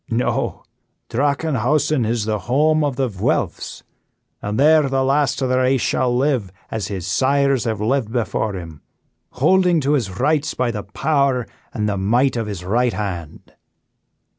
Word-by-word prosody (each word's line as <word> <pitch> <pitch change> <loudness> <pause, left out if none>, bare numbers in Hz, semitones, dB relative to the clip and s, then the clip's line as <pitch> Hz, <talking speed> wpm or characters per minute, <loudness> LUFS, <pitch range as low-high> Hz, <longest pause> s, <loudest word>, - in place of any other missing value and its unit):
No, 120 +1 -1 0.5
Drachenhausen 140 0 +1
is 115 -2 -1
the 110 -1 -1
home 155 +4 +3
of 145 -3 -1
the 135 0 0
Vuelphs, 95 -5 -2 0.6
and 105 +3 -3
there 150 0 +5
the 135 0 +1
last 140 0 +1
of 130 - 0
the 130 0 +2
race 130 +1 +2
shall 125 -1 +1
live 130 -8 0 0.2
as 110 -3 -3
his 95 -4 -5
sires 135 +5 +2
have 110 -3 -1
lived 115 +1 0
before 110 -2 -1
him, 80 -4 -8 0.5
holding 175 +5 +3
to 140 +2 +1
his 100 -10 -1
rights 150 +1 +1
by 125 -2 0
the 105 -2 -4
power 130 +5 0 0.3
and 105 -1 -2
the 100 -1 -1
might 120 +8 +2
of 115 -2 -2
his 95 -4 -6
right 120 +5 +1
hand." 90 -7 -6
125 Hz, 160 wpm, -20 LUFS, 105-140 Hz, 0.6 s, there